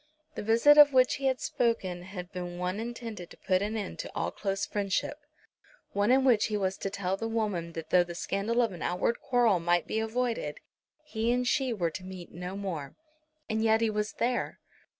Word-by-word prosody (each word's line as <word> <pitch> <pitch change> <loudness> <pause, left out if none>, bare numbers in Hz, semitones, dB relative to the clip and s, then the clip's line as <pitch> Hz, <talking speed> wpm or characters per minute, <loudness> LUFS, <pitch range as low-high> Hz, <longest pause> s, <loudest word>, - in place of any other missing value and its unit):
The - - -5
visit 230 +8 +6
of 290 -1 +9
which 255 -1 +4
he 270 0 -1
had 260 -1 +1
spoken 195 -7 -1
had 180 0 -8
been 180 -2 -5
one 180 +3 -2
intended 230 -5 -6
to - - -14
put 185 0 +1
an 215 +2 -2
end 200 -3 -5
to - - -5
all - - -1
close 195 -1 -2
friendship, 205 +8 -2 0.7
one 205 +2 +1
in 260 +1 +5
which 240 -5 +4
he 215 -1 -1
was 190 -1 0
to 195 - -3
tell 195 -1 -2
the 225 +3 -4
woman 205 -7 -2
that 160 -1 -7
though 180 -1 +6
the 175 0 -8
scandal 210 +7 0
of 230 - 0
an 175 -4 -9
outward 180 +6 0
quarrel 240 -7 +3
might 175 0 +2
be 220 - -1
avoided, 225 -8 -2 0.5
he 230 -6 -1
and 250 0 +1
she 260 0 +1
were 175 -7 -1
to 185 - -7
meet 185 -2 -9
no 180 +3 -6
more. 170 -9 -5 0.5
And 220 -1 0
yet 220 0 +4
he 225 -1 +1
was 210 0 -2
there. 245 +1 -1
205 Hz, 210 wpm, -29 LUFS, 180-235 Hz, 0.7 s, of